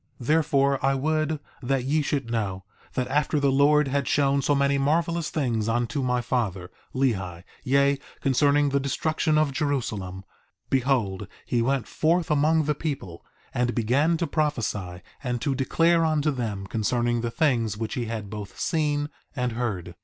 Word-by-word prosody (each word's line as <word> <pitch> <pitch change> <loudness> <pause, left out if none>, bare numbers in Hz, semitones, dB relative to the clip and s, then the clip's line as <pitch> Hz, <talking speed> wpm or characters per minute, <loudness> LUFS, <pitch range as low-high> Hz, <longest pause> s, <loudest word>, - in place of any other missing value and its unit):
1:18 120 - -8
Therefore, 140 -3 +3
I 135 0 +3
would 155 +2 0 0.2
that 135 0 0
ye 150 +4 +1
should 135 -4 -2
know, 100 -5 -2 0.3
that 125 -1 0
after 150 +1 +1
the 140 -1 +2
Lord 145 +2 +4
had 140 0 -1
shown 140 -1 +2
so 145 +2 +2
many 140 0 +2
marvelous 165 +3 +1
things 115 -7 -1
unto 120 +4 0
my 125 -1 +1
father, 105 -8 -2 0.2
Lehi, 95 -10 -1 0.2
yea, 140 +1 +3 0.2
concerning 145 +2 +3
the 140 0 +1
destruction 155 +3 0
of 155 -2 +2
Jerusalem, 110 -10 -2 0.5
behold 120 -8 +1 0.2
he 120 - +1
went 135 +1 0
forth 165 +1 +1
among 155 +2 +3
the 150 +1 +1
people, 135 - -5 0.3
and 120 0 0
began 140 +9 +2
to 170 - 0
prophesy 105 - -2 0.2
and 125 -2 -1
to 140 -3 0
declare 165 +5 +2
unto 155 -1 +2
them 110 -7 -3
concerning 120 +3 0
the 120 - -1
things 115 -7 +1
which 110 -1 -3
he 120 - -2
had 110 -2 -4
both 100 -1 -8
seen 150 -3 0 0.3
and 125 -1 -1
heard. 105 -7 -3
135 Hz, 160 wpm, -25 LUFS, 115-150 Hz, 0.5 s, Lord